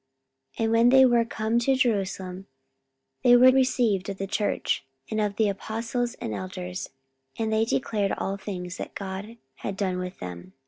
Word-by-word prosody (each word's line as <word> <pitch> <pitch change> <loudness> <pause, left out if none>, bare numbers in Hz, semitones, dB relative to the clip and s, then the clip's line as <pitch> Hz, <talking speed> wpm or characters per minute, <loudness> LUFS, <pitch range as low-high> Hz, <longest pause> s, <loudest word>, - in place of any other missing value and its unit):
44:015:004 - - 0
And 225 - +1
when 230 +1 +5
they 265 +1 +7
were 240 -2 +4
come 225 0 0
to 265 +3 +2
Jerusalem, 195 -6 -1 0.8
they 245 -1 +7
were 255 +1 +8
received 245 -7 +2
of 195 - -4
the 195 - -3
church, 205 +1 -1 0.3
and 215 0 0
of 205 -1 -1
the 220 0 +2
apostles 230 +4 -2
and 110 - -5
elders, 185 - -5 0.5
and 220 -1 -1
they 220 +1 +3
declared 215 -4 0
all 195 - -2
things 185 -2 -6
that - - -7
God 200 +4 -6 0.2
had 195 - -5
done 185 -3 -1
with 180 +1 -5
them. 90 0 -8
210 Hz, 175 wpm, -26 LUFS, 190-235 Hz, 0.8 s, were